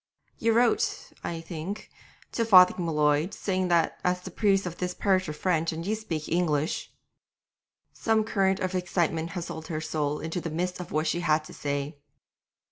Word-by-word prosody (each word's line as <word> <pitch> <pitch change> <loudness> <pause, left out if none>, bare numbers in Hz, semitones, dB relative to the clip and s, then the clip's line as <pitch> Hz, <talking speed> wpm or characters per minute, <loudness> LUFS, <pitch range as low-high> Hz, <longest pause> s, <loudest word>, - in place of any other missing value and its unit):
'You 225 0 +2
wrote, 235 0 +1
I 165 -1 -3
think, 170 +5 -6 0.4
to 230 - 0
Father 185 -5 +8
M'Leod, 155 -1 +1
saying 185 -2 -1
that 170 -2 +2
as 180 0 +1
the 185 - -8
priests 195 0 +2
of 175 -1 -6
this 180 0 -2
parish 185 -4 +1
are - - -1
French 165 +1 0
and 165 +1 -5
you 210 - 0
speak 175 -9 -4
English 160 -3 0 0.5
' - - -66 0.3
Some 220 -1 +1
current 195 -3 +1
of 185 0 -1
excitement 170 -2 -1
hustled 165 -3 -5
her 155 -2 -3
soul 150 -2 -1
into 165 +2 -3
the 165 - -4
midst 180 +3 -2
of 180 - -7
what 155 +1 0
she 165 +2 0
had 155 -3 +2
to - - -11
say. 145 +1 -3
175 Hz, 180 wpm, -27 LUFS, 160-185 Hz, 0.5 s, Father